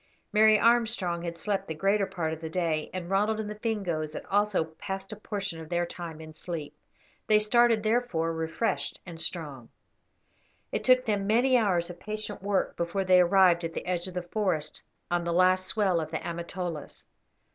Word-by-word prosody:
Mary 215 0 +6
Armstrong 225 -7 +2
had 170 -1 -5
slept 200 +4 -2
the 160 - -4
greater 195 +4 +2
part 170 -5 -2
of 160 - -8
the 160 - -5
day, 160 -3 -1
and 185 -2 -5
Ronald 210 +3 +1
and 215 - -3
the 210 0 -7
Fingoes 180 -9 -2
had - - -6
also 205 -3 +2
passed 190 +5 -7
a - - -5
portion 200 -5 -4
of 160 -1 -9
their 175 0 +1
time 170 -2 -7
in 155 0 -10
sleep. 160 -2 -6 0.5
They 215 - +6
started, 225 +1 +4
therefore, 215 -8 +1
refreshed 165 +6 -2
and 165 -3 -8
strong. 150 -8 -4 1.0
It - - -2
took 255 0 +5
them 205 -3 0
many 245 +5 +4
hours 180 -7 +2
of 175 - -12
patient 215 0 -6
work 200 0 0
before 170 +3 -1
they 185 -1 +6
arrived 180 -1 +5
at 165 0 -3
the - - -4
edge 180 0 -2
of 185 - -9
the 180 - -2
forest 175 -5 -2 0.3
on 175 0 +1
the 170 - -1
last 185 +1 +3
swell 195 -6 +1
of 155 - -5
the 160 - -4
Amatolas. 170 -1 -5
185 Hz, 190 wpm, -28 LUFS, 170-210 Hz, 1.0 s, Mary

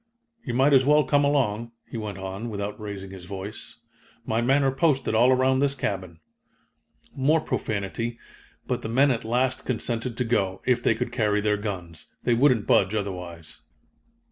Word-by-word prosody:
"You 120 - -3
might 135 +3 +4
as 135 -1 +6
well 150 +2 +5
come 145 +1 +2
along," 120 -5 0
he - - -10
went 105 -3 -4
on, 95 +4 -5
without 100 -1 -4
raising 100 -2 -7
his 95 -2 -10
voice. 100 +3 -8 0.5
"My 115 0 0
men 135 +4 +3
are 135 - +3
posted 135 -3 +1
all 120 +3 +5
around 130 0 +3
this 140 0 +1
cabin." 95 -9 -4 1.0
More 145 +4 +3
profanity, 115 -2 -3 0.5
but - - -2
the 110 - -5
men 135 +4 +4
at 115 - -1
last 125 +3 0
consented 115 -1 -3
to 125 - +1
go, 100 -6 -1
if 125 -1 +2
they 115 - +2
could 120 - -3
carry 105 -4 +1
their 105 0 +1
guns. 90 -6 -6 0.2
They 120 - +2
wouldn't 125 -3 +3
budge 100 +2 +3
otherwise. 90 -5 -6
115 Hz, 170 wpm, -25 LUFS, 100-130 Hz, 1.0 s, as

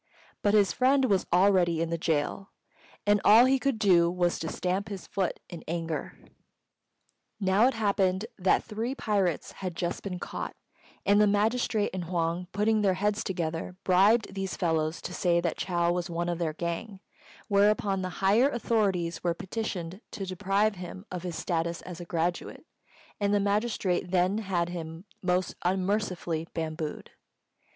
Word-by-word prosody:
But 205 0 +3
his 200 -4 +4
friend 265 +1 +3
was 200 -6 +1
already 180 -2 +4
in 165 0 -1
the 170 - 0
gaol, 160 +4 -1 0.6
and 205 -1 +3
all 225 +4 +8
he 265 +1 +3
could 275 -3 0
do 180 -5 +4
was 175 -1 0
to 160 - -3
stamp 185 +5 -2
his 195 -3 -6
foot 190 -3 -2
in 170 - -9
anger. 165 -1 -3 1.2
Now 195 +4 +4
it 265 - 0
happened 200 -2 +1
that 185 0 +3
three 230 +4 -3
pirates 195 - 0
had 185 -3 -6
just 175 0 -2
been 185 -3 -4
caught; - - -5 0.5
and 205 +1 +5
the 210 - +5
magistrate 215 +1 +1
and 185 -2 -3
Huang, 170 +1 -1
putting 215 +2 +2
their 195 -3 +2
heads 205 +2 0
together, 170 -1 -3
bribed 195 +4 +4
these 195 -1 -4
fellows 160 -1 0
to 180 - -5
say 175 -1 +2
that 170 -1 -1
Chou 175 -2 +1
was 175 0 -2
one 170 +1 -2
of 175 -1 -2
their 160 -2 -1
gang, 170 +5 -4 0.5
whereupon 200 -1 +2
the 185 - -3 0.2
higher 225 +8 +5
authorities 200 -9 0
were 170 -1 +1
petitioned 190 -2 -5
to 195 - -5
deprive 195 +2 0
him 185 +2 -8
of 180 -1 -4
his 175 -2 -5
status 170 0 -2
as 180 -1 -8
a 175 - -7
graduate, 170 +1 -2 0.5
and 205 0 +2
the - - +3
magistrate 200 -3 0
then 185 +3 +2
had 180 -5 -1
him 165 0 -7 0.2
most 180 0 0
unmercifully 185 -3 -1
bambooed. 155 -1 -4
185 Hz, 160 wpm, -28 LUFS, 170-205 Hz, 1.2 s, all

